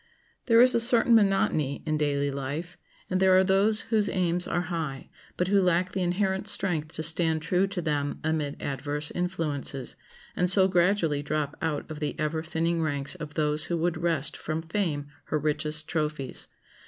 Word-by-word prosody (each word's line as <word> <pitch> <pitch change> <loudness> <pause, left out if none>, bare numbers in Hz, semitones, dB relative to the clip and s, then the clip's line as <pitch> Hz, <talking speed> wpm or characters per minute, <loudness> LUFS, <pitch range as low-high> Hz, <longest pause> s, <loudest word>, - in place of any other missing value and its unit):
There 230 -1 +6
is 255 +1 +7
a - - +3
certain 235 0 +4
monotony 195 -9 +2
in 155 -1 0
daily 145 -1 0
life, 140 +6 -5 0.3
and 185 - -1
there 190 -1 +5
are 190 - +5
those 200 +3 +3
whose 210 -2 +3
aims 175 -1 0
are 175 - 0
high, 150 -5 -4 0.3
but 180 - 0
who 200 0 +4
lack 180 0 +1
the 190 - -2
inherent 190 +2 0
strength 175 -7 0
to 160 - -3
stand 160 -1 +2
true 180 +4 +1
to 190 -3 -4
them 145 -2 -2
amid 155 -2 -2
adverse 145 +2 -3
influences, 155 -7 -2 0.4
and 180 0 +1
so 190 0 +5
gradually 175 -5 +2
drop 150 0 -2
out 155 -3 -2
of 155 - -6
the 150 -2 -3
ever 155 +1 -1
thinning 165 +1 -1
ranks 145 -3 0
of 150 -1 -8
those 150 -1 +1
who 170 - -1
would 170 +1 0
wrest 165 -4 0
from 155 +1 -4
Fame 165 -4 -2 0.2
her 155 - -1
richest 150 +1 -1
trophies. 150 -4 -3
160 Hz, 180 wpm, -27 LUFS, 150-185 Hz, 0.4 s, is